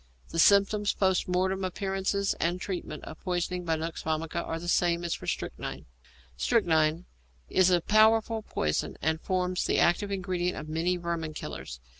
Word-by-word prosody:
The 165 - -3
symptoms, 200 +3 +4
post 190 -2 +2
mortem 190 +1 0
appearances, 195 +1 -1
and 175 +2 0
treatment, 175 -5 -5
of 155 - -9
poisoning 180 -1 -2
by 165 -1 +1
nux 160 +1 -4
vomica 160 0 -2
are 165 - -3
the 170 +1 -7
same 175 -1 +2
as 170 - -1
for - - -7
strychnine. - - -4 0.5
=Strychnine= 160 - +2 0.4
is 185 -1 +4
a 175 -1 +3
powerful 220 +2 +4
poison, 75 - -2
and 160 +1 0
forms 185 -1 0
the - - +1
active 175 +4 +3
ingredient 180 -2 -1
of 155 - -6
many 165 +3 0
'vermin 170 -3 -3
killers.' - - -7
180 Hz, 160 wpm, -28 LUFS, 165-190 Hz, 0.5 s, symptoms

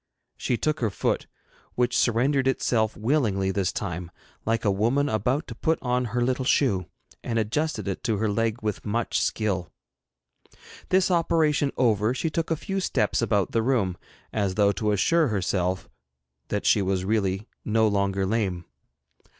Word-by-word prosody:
She 125 - -1
took 155 +4 0
her 115 - +1
foot, 95 - -1 0.5
which 125 0 +1
surrendered 130 +3 +2
itself 115 -4 +1
willingly 110 -6 +1
this 95 -2 0
time, 90 -3 -4 0.4
like 115 0 0
a 100 - +4
woman 120 +9 +1
about 130 +5 0
to - - -7
put 160 0 0
on 125 0 +1
her 120 +2 -1
little 130 +1 0
shoe, 100 - +2 0.4
and 115 - -2
adjusted 120 +6 -1
it 95 - -3
to 110 -4 +1
her 110 +2 0
leg 115 +2 -1
with 105 -2 -2
much 115 +3 -1
skill. 95 -6 -1 1.2
This 185 0 +3
operation 160 -4 +2
over, 110 -1 +2
she 160 +3 -1
took 165 +1 -2
a 165 - +2
few 195 +5 -3
steps 185 - 0
about 105 -4 +1
the 115 - +1
room, 110 -7 +1 0.4
as 100 -3 0
though 100 0 +4
to 105 +1 -1
assure 155 - +3
herself 95 -3 -1 0.6
that - - -2
she 105 - +4
was 95 -1 0
really 100 0 0 0.2
no 110 0 +2
longer 100 -1 +1
lame. 95 -4 -1
110 Hz, 160 wpm, -25 LUFS, 100-130 Hz, 1.2 s, a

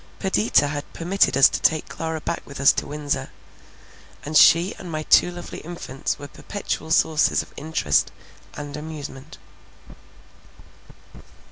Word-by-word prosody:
Perdita 190 -6 +2
had 145 0 -6
permitted 175 -3 +1
us 135 - +8
to - - -4
take 155 -1 +2
Clara 160 -1 -4
back 170 - -3
with 140 - -10
us 140 - +6
to - - -3
Windsor; 145 -1 -3 1.0
and 155 +2 -5
she 170 +4 +6
and 180 -3 -8
my 155 -1 -3
two 175 - +5
lovely 175 0 -8
infants 160 -5 -5
were 145 - -9
perpetual 160 +1 -5
sources 160 -1 +2
of - - -19
interest 145 - 0 0.4
and 145 -1 -7
amusement. 150 -2 -8
155 Hz, 135 wpm, -23 LUFS, 145-170 Hz, 1.0 s, us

